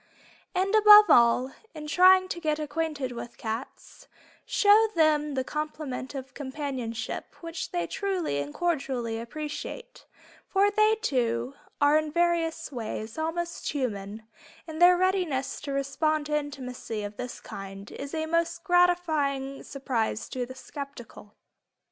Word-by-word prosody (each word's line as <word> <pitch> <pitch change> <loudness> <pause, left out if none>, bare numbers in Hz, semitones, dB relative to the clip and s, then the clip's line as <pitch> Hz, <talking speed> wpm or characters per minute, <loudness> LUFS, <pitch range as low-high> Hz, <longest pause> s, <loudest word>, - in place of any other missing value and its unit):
And 380 +3 +1
above 425 -1 +9
all, 240 +2 +5 0.2
in 305 -1 -7
trying 370 +4 +6
to 345 - -3
get 305 -3 0
acquainted 300 -3 -3
with 240 0 -8
cats, 225 +3 -7 0.4
show 420 +2 +5
them 300 -3 +2
the 260 - 0
compliment 300 -2 -5
of 265 -1 -7
companionship 265 -5 -5
which 330 -1 -5
they 175 -1 -2
truly 365 - -2
and 145 0 -4
cordially 265 - -2
appreciate, 305 - -7 0.4
for 400 +1 +3
they, 430 +1 +4
too, 240 - 0 0.3
are 290 +2 +5
in 310 -1 -4
various 340 -1 0
ways 220 -3 -5
"also 325 +2 -1 0.3
human" 215 -6 -4 0.4
and 320 0 -7
their 355 0 +8
readiness 360 -8 0
to 290 - -5
respond 290 +3 0
to 300 0 -1
intimacy 255 -7 -4
of 205 0 -7
this 250 0 -6
kind 195 +1 -9
is 280 +3 -6
a 315 0 -1
most 335 +1 -1
gratifying 315 -7 +1
surprise 240 -6 -2
to 250 -1 -3
the 260 - -9
skeptical. 260 -6 -10
290 Hz, 135 wpm, -27 LUFS, 250-335 Hz, 0.4 s, above